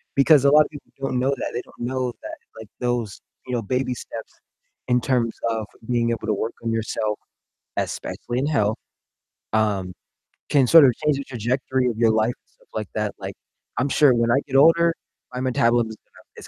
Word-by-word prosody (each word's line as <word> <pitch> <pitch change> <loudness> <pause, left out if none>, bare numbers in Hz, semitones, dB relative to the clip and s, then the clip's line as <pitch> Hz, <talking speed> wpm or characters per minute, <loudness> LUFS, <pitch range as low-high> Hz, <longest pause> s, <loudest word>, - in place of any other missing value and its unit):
because 140 0 +5
a 140 - +6
lot 150 0 +7
of - - -9
people 145 -2 -13
don't 130 -2 -1
know 130 +2 +1
that, 140 - -2
they 120 - -2
don't - - -21
know 125 0 -2
that, - - -7 0.2
like, 110 - -9
those, 120 -4 -2 0.3
you 125 - -4
know, 120 - 0
baby 130 +3 -1
steps 115 0 -8 0.6
in 125 0 +3
terms 120 -4 0 0.2
of 110 -1 -2 0.2
being 120 -1 +1
able 115 - -3
to 110 - +2
work 110 +3 -3
on 115 - -1
yourself, 110 -1 -2 0.6
especially 120 +1 -3
in 135 - 0
health, 110 -8 +1 0.8
um, 100 -4 +1 0.6
can 135 -4 +4
sort 165 -1 +9
of 125 - +4
change 150 -2 +2
the 140 - -4
trajectory 130 +1 -1
of 115 -3 -2
your 115 -1 +4
life 110 +2 +1
and - - -56
stuff - - -29
like 110 -2 -3
that, 105 -1 -1
like, - - -6 0.5
I'm 135 +3 +1
sure 140 -1 +5
when 115 -1 +1
I - - +4
get 135 - -5
older, 165 +4 +6 0.4
my 125 - -4
metabolism 120 -2 +2
is 110 - -10
gonna - - -23 0.2
is - - -10
120 Hz, 205 wpm, -23 LUFS, 115-135 Hz, 0.8 s, sort